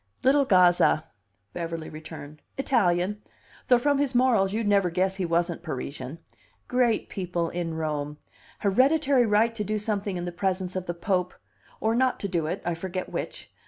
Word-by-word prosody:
"Little 275 +2 +4
Gazza," 180 -6 +4 0.5
Beverly 165 -1 -4
returned. 155 -1 -10 0.2
"Italian; 205 -6 +1 0.5
though 250 - +6
from 285 +3 +2
his 275 -3 0
morals 235 -6 +3
you'd 220 +1 -1
never 200 -3 +3
guess 190 +2 0
he 190 - -1
wasn't 170 0 0
Parisian. 140 -2 -5 0.5
Great 245 -3 +1
people 175 -3 -2
in 170 -2 -3
Rome. 150 -2 -3 0.4
Hereditary 260 +4 +3
right 220 +2 +3
to 220 -2 -3
do 215 +1 -1
something 205 -2 -2
in 175 - -4
the 175 - -3
presence 185 0 -2
of 185 -1 -3
the 175 - -3
Pope 180 0 -1 0.4
or 220 +1 +1
not 255 +2 +2
to 200 - -1
do 170 -5 -1
it, 180 +5 -3
I 175 - 0
forget 185 +2 -4
which. - - -6
185 Hz, 165 wpm, -26 LUFS, 170-225 Hz, 0.5 s, though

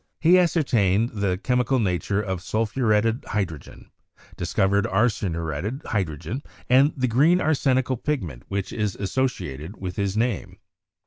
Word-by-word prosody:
He 175 +3 +6
ascertained 120 - +2
the 100 -4 -1
chemi 125 +5 +1
cal 135 - +2
nature 100 -1 0
of 95 -3 -3
sulphuretted 110 +2 +1
hydrogen, 90 -9 -5 0.4
discovered 100 +1 +1
arsen 100 -3 +1
uretted 85 - -4
hydrogen, 100 - -3 0.3
and 135 +4 +5
the 130 -1 +1
green 150 +10 +4
arsenical 130 -5 +1
pigment 95 - -3
which 100 -1 -3
is 105 -3 -1
associated 100 - -3
with 90 -2 -6
his 100 0 -1
name. 115 -4 -1
105 Hz, 130 wpm, -24 LUFS, 95-130 Hz, 0.4 s, He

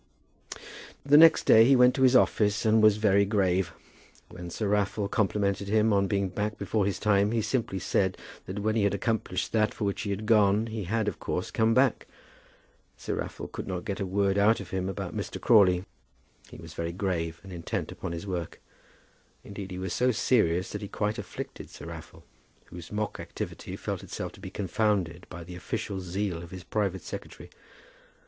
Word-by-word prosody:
The 140 +1 +5
next 160 +1 +8
day 110 - +7
he 135 +4 +5
went 125 0 +6
to - - -3
his 130 -1 +5
office 105 -4 +3
and 110 0 +4
was 105 -1 +5
very 100 -2 +4
grave. 95 -3 +1 0.6
When 90 0 -8
Sir 105 +5 -3
Raffle 105 0 0
complimented 100 -2 0
him 110 +1 +3
on 100 0 +2
being 100 -1 0
back 105 +3 -3
before 105 -3 0
his 100 - -1
time, 100 -1 +2
he 115 -2 +1
simply 115 -6 -1
said 95 0 0 0.3
that 95 +3 -5
when 110 +2 0
he 110 - +2
had 100 -1 +2
accomplished 100 -3 -2
that 110 -1 +1
for - - -4
which 100 - -2
he 105 - -4
had 100 +2 -3
gone, 105 -1 +4
he 110 -3 -5
had, 110 +3 -1
of 100 - -3
course, - - -3
come 110 +1 +2
back. 130 -2 +2 0.9
Sir - - -4
Raffle - - -5
could - - -7
not 90 -2 -4
get 100 -1 -3
a 100 - -1
word 100 +1 +1
out 110 +3 +4
from 95 -2 -7
him 95 0 -1
about 95 - -5
Mr. - - -4
Crawley. 95 -5 +4 0.6
He - - -11
was 80 -1 -11
very 85 +1 -3
grave, 85 -3 -2
and 95 -1 -10
intent 85 -1 -4
upon - - -6
his 85 +2 -5
work. 90 -4 -4 0.8
Indeed 100 -1 -8
he 90 - -6
was 95 -2 -3
so 125 - +2
serious 100 -7 +1
that - - -5
he 100 - -5
quite 105 +1 -2
afflicted - - -7
Sir - - -11
Raffle, - - -10 0.5
whose 85 -2 -10
mock 105 0 -3
activity - - -6
felt - - -4
itself - - -6
to - - -16
be 95 - -7
confounded 95 -3 -1
by 85 - -8
the 90 +2 -9
official 95 +2 -4
zeal 90 -1 -3
of 85 - -10
his 95 -1 -9
private 100 -3 -2
secretary. - - -9
100 Hz, 195 wpm, -28 LUFS, 95-110 Hz, 0.9 s, next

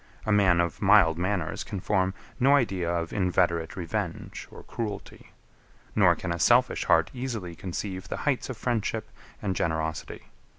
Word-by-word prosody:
A 110 - 0
man 95 -4 +4
of 85 -2 -1
mild 80 +1 +5
manners 90 -3 -1
can 100 -3 -5
form 95 -1 0 0.2
no 135 +3 +5
idea 95 -10 0
of 85 -1 -2
inveterate 90 -4 +1
revenge 85 -4 -4
or - - -12
cruelty; 105 -4 -6 0.6
nor - - +5
can 90 - -4
a 85 - -2
selfish 120 +8 +3
heart - - +3
easily 120 -9 -4
conceive 95 +2 -5
the - - -4
heights 140 -3 0
of 130 - -5
friendship 110 -2 -2 0.3
and 95 -2 -1
generosity. 80 -2 -3
95 Hz, 155 wpm, -27 LUFS, 85-110 Hz, 0.6 s, mild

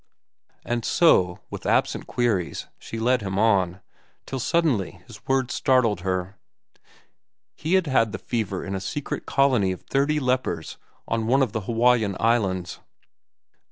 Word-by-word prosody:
And 120 0 -2
so, 90 - +3
with - - -6
absent - - +1
queries, 110 -8 -1
she 115 - -7
led 125 +2 +2
him 95 -1 -3
on, 95 -4 +2 0.4
till 135 - -4
suddenly 140 - 0
his - - -13
words 135 -1 +1
startled 125 -8 +2
her. 95 +1 -3 1.2
He 165 +4 0
had 185 -2 +3
had 130 -6 +2
the - - -4
fever 105 -6 -3
in 95 - -4
a 95 - -3
secret 135 +9 -4
colony 130 -9 +3
of 95 - -6
thirty 145 +2 0
lepers 125 - -1 0.3
on 115 -1 -1
one 135 +3 +4
of 125 - -1
the 110 0 -3
Hawaiian 115 -2 +2
Islands. 95 -7 0
115 Hz, 145 wpm, -24 LUFS, 95-130 Hz, 1.2 s, one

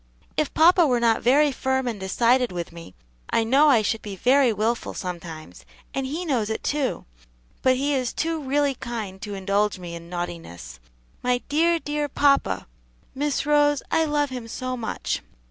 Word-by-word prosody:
"If 305 - 0
papa 340 +1 +6
were 250 -3 +2
not 230 -1 +2
very 285 +4 +4
firm 265 0 -1
and 225 -4 -3
decided 235 +6 +2
with 175 -1 -5
me, 165 - -12 0.3
I 230 - +2
know 275 +7 +5
I 235 -6 +5
should 220 +2 -1
be 205 -2 -7
very 255 +5 +4
wilful 220 +3 -1
sometimes, 165 - -7 0.3
and 270 -1 -2
he 320 +6 -4
knows 240 -9 0
it, 220 - -3
too; 285 -3 -1 0.6
but 260 0 +4
he 280 +3 0
is 255 -3 0
too 325 -1 -2
really 285 +1 +1
kind 220 -6 -6
to 205 -1 -5
indulge 200 +1 0
me 175 -2 -8
in 170 0 -9
naughtiness. 165 - -6 0.4
My 250 0 0
dear, 335 +3 +3
dear 295 -2 -3
papa! 275 - +2 0.5
Miss 285 0 -1
Rose, 290 -1 +3
I 325 - +3
love 295 -2 0
him 250 -3 -6
so 255 +2 -4
much." 230 - -3
250 Hz, 175 wpm, -24 LUFS, 200-285 Hz, 0.6 s, papa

